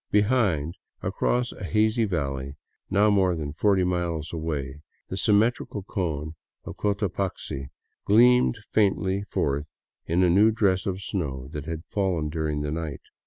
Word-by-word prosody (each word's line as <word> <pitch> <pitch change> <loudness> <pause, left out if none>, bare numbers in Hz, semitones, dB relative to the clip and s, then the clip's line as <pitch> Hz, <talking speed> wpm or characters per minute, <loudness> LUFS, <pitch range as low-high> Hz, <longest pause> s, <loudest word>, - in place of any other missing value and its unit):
Behind, 100 - +2 0.3
across 125 0 0
a - - -10
hazy 110 +4 +2
valley, 70 -7 -3 0.3
now 105 +2 +4
more 95 -3 +3
than 75 -3 -4
forty 95 +3 +3
miles 85 -3 -2
away, 75 -4 -4 0.3
the - - -3
symmetrical 105 0 +1
cone 80 -6 -3 0.3
of - - -8
Cotapaxi 95 -9 -2 0.4
gleamed 125 +3 +5
faintly 100 -2 +2
forth 70 +2 -2 0.3
in 85 +3 +2
a 90 - +4
new 105 +5 +6
dress 100 -3 +1
of 95 0 -3
snow 70 -8 -3
that 75 -1 -6
had 80 0 -4
fallen 90 -7 0
during 75 -2 -2
the 75 - -2
night. 80 -2 -4
90 Hz, 140 wpm, -26 LUFS, 75-105 Hz, 0.4 s, new